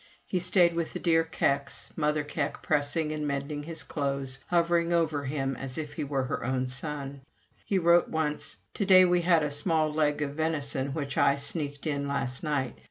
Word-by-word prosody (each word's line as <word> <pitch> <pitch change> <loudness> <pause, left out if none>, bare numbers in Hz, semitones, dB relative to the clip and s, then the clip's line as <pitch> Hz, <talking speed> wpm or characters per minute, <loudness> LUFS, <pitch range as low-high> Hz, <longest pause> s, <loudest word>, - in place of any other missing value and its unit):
He 185 - -1
stayed 175 -1 +4
with 165 -1 -2
the - - -4
dear 165 -2 +3
Kecks, 140 -3 -1
Mother 150 -1 +1
Keck 145 0 -3
pressing 150 +2 0
and 150 -1 -2
mending 140 +1 -3
his 165 +2 -6
clothes, 135 -2 -3
hovering 170 0 +2
over 160 -4 +1
him 135 -1 -1
as 130 0 -6
if 150 -2 -4
he 150 - -3
were 140 -2 -1
her 130 - -3
own 130 +1 0
son. 140 +1 -5 0.4
He 195 - 0
wrote 170 -1 +4
once: 150 -2 -2 0.2
"To 200 - -1
day 185 -1 +8
we 180 0 +3
had 170 -2 +4
a 150 - -1
small 155 +1 0
leg 150 -1 +1
of 140 - -3
venison 145 -3 -1
which 140 -3 -2
I 140 - +5
sneaked 145 0 -4
in 140 -2 -1
last 135 -2 -2
night. 145 -6 -2
150 Hz, 190 wpm, -28 LUFS, 140-165 Hz, 0.4 s, day